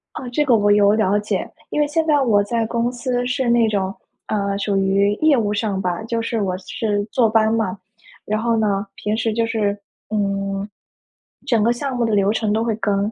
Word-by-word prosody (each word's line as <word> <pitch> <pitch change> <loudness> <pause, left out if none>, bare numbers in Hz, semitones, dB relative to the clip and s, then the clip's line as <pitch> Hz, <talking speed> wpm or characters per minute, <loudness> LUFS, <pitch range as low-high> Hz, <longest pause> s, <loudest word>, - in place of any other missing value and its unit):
啊， - - -6
这 295 +5 0
个 250 - +4
我 205 -1 +3
有 205 0 +5
了 210 -2 +2
解。 210 - -3 0.2
因 300 - +1
为 295 - +2
现 320 +2 0
在 295 -3 +3
我 215 -5 +3
在 230 +2 -1
公 235 +1 0
司 245 0 -2
是 250 0 0
那 235 -1 +4
种， 195 -2 -1 0.3
呃， 200 -1 -1
属 200 -1 -1
于 195 +1 +2
业 305 +1 +3
务 210 -2 0
上 205 -2 -1
吧， 180 -1 -2
就 230 +1 -2
是 230 -1 -2
我 185 -2 -1
是 205 0 -2
坐 235 -4 +3
班 220 0 +3
嘛。 215 -4 -1 0.5
然 215 +1 -2
后 230 0 +1
呢， 205 -2 0
平 210 +1 -2
时 225 -1 0
就 230 0 +1
是， 210 -3 -1 0.3
嗯， 195 -1 -2 0.8
整 235 -5 +2
个 235 +3 +3
项 265 +1 -4
目 235 - +1
的 225 - 0
流 200 0 +3
程 215 -1 0
都 220 +1 +1
会 230 -1 0
跟。 205 -1 0
215 Hz, 230 characters per minute, -20 LUFS, 200-235 Hz, 0.8 s, 有